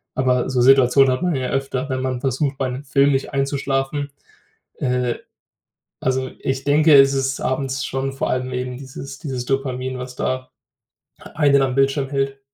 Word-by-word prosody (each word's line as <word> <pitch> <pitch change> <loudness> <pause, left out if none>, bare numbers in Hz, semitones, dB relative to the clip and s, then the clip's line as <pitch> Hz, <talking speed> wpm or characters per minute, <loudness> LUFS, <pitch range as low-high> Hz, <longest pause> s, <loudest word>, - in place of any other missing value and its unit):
Aber 125 -1 +1
so 125 -1 +1
Situationen 135 +1 +5
hat 130 +7 -1
man 180 -1 +1
ja 130 -1 -2
öfter, 135 0 -2
wenn 130 -1 -2
man 130 -1 -2
versucht, 135 +1 -1
bei 130 -2 0
'nem 125 +3 -6
Film 140 0 +3
nicht 135 +2 -2
einzuschlafen. 140 +1 -1 0.7
Äh, 125 -2 0 0.9
also, 130 0 -1
ich 135 0 -2
denke, 150 +2 +5
es 135 0 +7
ist 135 0 -1
abends 135 +1 -2
schon 135 0 -3
vor 135 - -2
allem 130 0 -2
eben 125 0 -3
dieses 135 0 -9
dieses 130 -5 -4
Dopamin, 130 -1 -2
was 125 0 -7
da 130 0 -3 0.9
einen 140 -3 +4
am 130 -1 0
Bildschirm 135 0 +2
hält. 135 -1 -2
135 Hz, 170 wpm, -21 LUFS, 130-140 Hz, 0.9 s, es